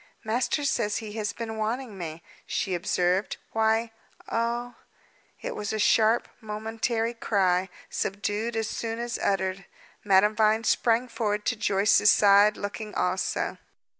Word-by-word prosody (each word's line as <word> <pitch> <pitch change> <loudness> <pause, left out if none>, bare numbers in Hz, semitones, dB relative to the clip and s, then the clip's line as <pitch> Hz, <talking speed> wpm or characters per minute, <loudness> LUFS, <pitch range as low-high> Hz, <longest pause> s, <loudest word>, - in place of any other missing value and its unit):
"Master 245 +6 0
says 215 -6 0
he 215 -2 -6
has 210 -2 -2
been 225 -1 -6
wanting 225 +1 -3
me," 165 -3 -7 0.2
she 190 - -1
observed. 180 +2 0
"Why 225 +1 +1 0.4
oh!" 235 +1 -1 0.7
It - - -4
was 210 - -3
a 220 - -2
sharp, 220 +2 +3
momentary 225 +2 -2
cry, 190 -5 +1 0.2
subdued 205 +3 -2
as 225 -1 -1
soon 225 +1 -4
as 235 0 -3
uttered. 190 -1 -1 0.4
Madame 205 +1 +4
Vine 220 +1 +3
sprang 235 +1 +2
forward 215 -3 -2
to 245 - +1
Joyce's 205 -1 +3
side, 205 +1 +6
looking 210 +1 -6
also. 185 +1 -1
215 Hz, 135 wpm, -27 LUFS, 200-230 Hz, 0.7 s, side